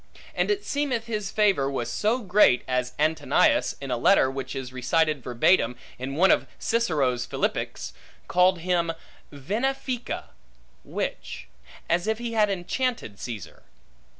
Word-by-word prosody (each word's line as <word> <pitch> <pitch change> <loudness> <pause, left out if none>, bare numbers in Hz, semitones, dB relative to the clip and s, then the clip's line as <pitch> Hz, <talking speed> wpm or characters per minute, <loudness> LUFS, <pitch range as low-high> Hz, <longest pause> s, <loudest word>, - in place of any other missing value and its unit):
And - - 0
it 410 0 0
seemeth 275 -6 -1
his 210 -4 -3
favor 195 -11 +2
was 125 -4 -3
so 220 - 0
great, 185 -10 +4
as 125 0 -1
Antonius, 155 +2 +2
in - - -6
a - - 0
letter 130 - +4
which 135 -1 -5
is 130 -1 -6
recited 155 +3 +1
verbatim 125 +1 +2 0.2
in 135 +2 -4
one 185 +5 +5
of - - +2
Cicero's 150 - 0
Philippics, - - -2 0.3
calleth 180 -1 +3
him 170 -1 0 0.4
venefica, 240 - -2 0.6
witch; - - -5 0.4
as 175 +4 +1
if 220 0 +1
he 235 0 -4
had 215 -2 +3
enchanted 195 - -2
Caesar. 110 -8 -7
175 Hz, 135 wpm, -26 LUFS, 130-220 Hz, 0.6 s, one